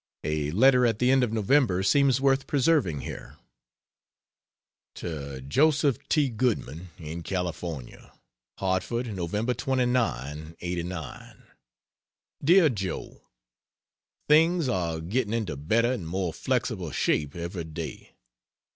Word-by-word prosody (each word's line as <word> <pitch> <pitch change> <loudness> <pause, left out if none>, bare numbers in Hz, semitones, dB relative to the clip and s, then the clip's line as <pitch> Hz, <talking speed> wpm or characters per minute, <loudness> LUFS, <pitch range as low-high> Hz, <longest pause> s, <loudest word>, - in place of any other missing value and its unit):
A 75 -1 -1
letter 125 - +5
at 115 -2 0
the 125 +3 +3
end 135 -1 +4
of 120 - 0
November 110 -3 +2
seems 135 +5 +4
worth 135 0 +2
preserving 135 - +2
here. - - -8 1.6
To 70 -5 -6
Joseph 140 - +2
T. 150 -3 +3
Goodman, 105 - -2
in 80 0 -6
California: 85 -6 -5 0.5
HARTFORD, 105 +5 -1
Nov. 105 +8 -1
29, 110 - -1
'89. 85 -3 -6 1.0
DEAR 170 +2 +6
JOE, 100 -7 -5 1.1
Things 165 +1 +4
are 85 -8 -1
getting 110 +6 -1
into 105 -10 -2
better 110 - +1
and 100 -11 -4
more 90 -1 -2
flexible - - -2
shape 75 -2 0
every 85 0 -4
day. 80 0 -8
100 Hz, 110 wpm, -27 LUFS, 80-130 Hz, 1.6 s, DEAR